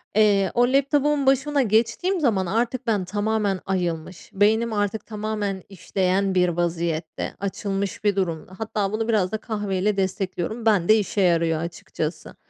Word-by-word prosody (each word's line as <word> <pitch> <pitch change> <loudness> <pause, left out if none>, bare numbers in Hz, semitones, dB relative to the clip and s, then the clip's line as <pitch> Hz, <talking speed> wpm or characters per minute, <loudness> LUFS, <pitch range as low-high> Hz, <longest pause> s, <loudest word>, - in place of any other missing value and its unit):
Eee, 205 -3 +4
o 245 0 +4
laptopumun 285 +1 +2
başına 275 +2 +3
geçtiğim 235 - +1
zaman 215 - +1
artık 230 +5 -1
ben 205 -5 +1
tamamen 205 0 0
ayılmış, 175 -2 -3
beynim 220 +3 +2
artık 205 +1 -1
tamamen 210 -3 -3
işleyen 190 0 0
bir 180 -1 +4
vaziyette, 170 -1 -2
açılmış 200 +1 -3
bir 205 -1 +2
durumda, 180 -1 -2
hatta 210 -3 -2
bunu 220 +1 -2
biraz 205 -5 +1
da 220 - -1
kahve 205 -4 -3
ile 205 +1 +1
destekliyorum. 190 +3 -2
Bende 215 -1 +4
işe 205 -1 0
yarıyor 165 -3 +2
açıkçası, 165 -1 -5
205 Hz, 145 wpm, -23 LUFS, 185-220 Hz, -, Eee